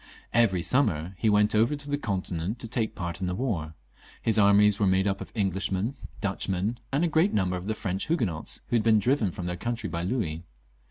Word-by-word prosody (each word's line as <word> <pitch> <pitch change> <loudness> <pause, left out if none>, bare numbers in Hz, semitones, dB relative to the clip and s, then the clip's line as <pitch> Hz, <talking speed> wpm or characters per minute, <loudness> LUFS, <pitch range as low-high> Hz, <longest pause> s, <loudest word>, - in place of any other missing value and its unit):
Every 100 -7 +3
summer 95 - +1
he 110 - +2
went 105 +1 +3
over 115 +7 +3
to 145 0 -5
the 145 - 0
Continent 95 - -3
to 115 - -5
take 115 -1 -2
part 85 -1 -5
in 90 - -1
the 90 - -2
war; 90 -10 -2 0.4
his 110 -1 +2
armies 100 0 +5
were 100 - +3
made 95 +1 +3
up 100 -1 -1
of - - -8
Englishmen, 95 +2 -1 0.3
Dutchmen, 100 +2 -2
and 140 +5 +1
a - - +3
great 165 +5 +2
number 90 -3 +1
of 90 +2 -6
the 110 - -1
French 95 -2 -3
Huguenots 110 - -1
who - - +1
had 115 - +3
been 110 -1 +5
driven 115 0 +2
from 90 - -6
their 90 0 -3
country 115 0 -3
by 85 0 -3
Louis. 90 -5 -2
100 Hz, 215 wpm, -27 LUFS, 90-115 Hz, 0.4 s, armies